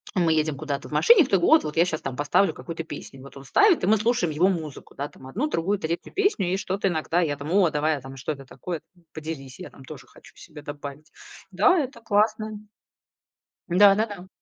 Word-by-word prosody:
мы 170 -4 +3
едем 155 -2 0
куда-то 145 -1 -4
в - - -16
машине, 450 -9 +6
кто-то: 185 -3 +2 0.2
"Вот 150 +1 -5
я 170 - +5
сейчас 160 -3 -3
поставлю 145 +8 +1
какую-то 165 -1 -7
песню". 145 -4 -10
Вот 140 +1 -13
он 135 - -11
ставит, 395 - +4
и - - +1
мы 215 - +5
слушаем 220 -6 0
его 175 +6 +3
музыку, 160 -7 -5
да, 140 - -4
там 130 - -15
одну, 225 - -2
другую, 200 - -1
третью 170 -1 -4
песню, 295 - +1
и - - +1
что-то 195 0 -1
иногда 170 +1 0
я 145 -4 -1
там: 145 +3 -6
"О, 190 -3 +4
давай", 155 0 0
а - - -10
там: 135 +1 -10
"Что 130 +4 -3
это 135 -1 -12
такое? 170 +4 -6 0.3
Поделись, 150 -5 -7
я - - -8
там 135 - -16
тоже - - -11
хочу - - -18
себе 155 -3 -13
добавить". 145 +1 -8 0.4
Да, 375 -3 +4
это 260 -5 -4
классно. 215 -1 0 1.1
Да-да-да. 200 +1 +3
165 Hz, 205 wpm, -25 LUFS, 145-205 Hz, 1.1 s, машине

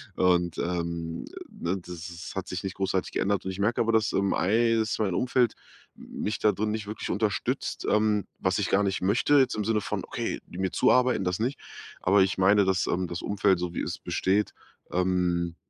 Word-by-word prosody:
Und, 90 -2 +2
ähm, 85 -1 -3 0.2
ne, 90 +3 -3
das - - -9 0.2
s 85 0 -8
hat 95 - -4
sich 90 -1 -4
nicht 95 -1 -4
großartig 95 -1 -1
geändert. 100 -1 0
Und 95 - -2
ich 95 - -8
merke 110 +4 +1
aber, 115 0 +2
dass, 110 -2 +2
ähm, 100 0 +1
ei 115 +4 +2
dass 110 0 -1
mein 100 -4 +1
Umfeld, 125 -2 +2 0.4
m - - -9
mich 105 - -1
da 105 - +4
drin 105 +2 -1
nicht 110 -2 -4
wirklich 105 - -5
unterstützt. 105 -2 -1
Ähm, 105 -1 +2 0.2
was 95 -1 +1
ich 100 - 0
gar 100 - +3
nicht 95 -1 -1
möchte 105 +10 +2
jetzt 130 - +2
im 105 -1 -2
Sinne 110 0 +1
von, - - -3
okay, - - -3
die - - -10
mir 95 -1 0
zuarbeiten, 125 -6 +3
das 90 +1 -1
nicht. 125 +5 -1 0.4
Aber 95 +2 +4
ich 95 - -1
meine, 100 +2 +5
dass, 95 -2 +1
ähm, 90 0 0
das 85 +1 -5
Umfeld 100 -2 +2
so 90 -1 -3
wie - - -2
es - - -4
besteht, 100 +3 0 0.4
ähm, 90 -2 0
95 Hz, 210 wpm, -27 LUFS, 90-105 Hz, 0.4 s, meine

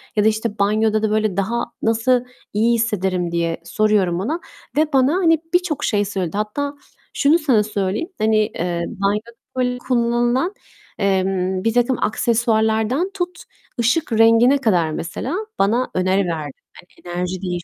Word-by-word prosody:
ya 210 - +3
da, - - +4
işte, 220 -1 -1
"Banyoda 215 +2 +2
da 220 - +2
böyle 215 -3 0
daha 225 +5 0 0.2
nasıl 240 +3 +2 0.3
iyi 225 +3 +3
hissederim?" 190 -6 -1
diye 170 -1 -1
soruyorum 200 -4 +1
ona 295 - -2 0.4
ve 310 0 +2
bana, 265 +2 +4
hani, 330 -4 +3
birçok 350 -5 +1
şey 205 -1 +1
söyledi. 195 -2 -3
Hatta 280 +8 -2 0.4
şunu 300 +4 +3
sana 255 -9 +3
söyleyeyim, 205 - -2
hani, 220 0 +2
eee, 175 -5 -1
banyoda, 210 +2 -2 0.3
böyle, 250 -1 0
kullanılan, 240 - +1 0.5
emm, 190 -1 0
birtakım 240 +2 +2
aksesuarlardan 225 - +1
tut 360 -2 -4 0.4
ışık 245 +6 +1
rengine 230 +4 +5
kadar 180 - +1
mesela 180 - -4 0.2
bana 235 +6 +1
öneri 185 +1 +1
verdi. 155 -5 -4 0.2
Hani, 175 - -16 0.3
enerji 180 +1 -3
değiş 175 -2 -3
220 Hz, 145 wpm, -20 LUFS, 195-250 Hz, 0.5 s, rengine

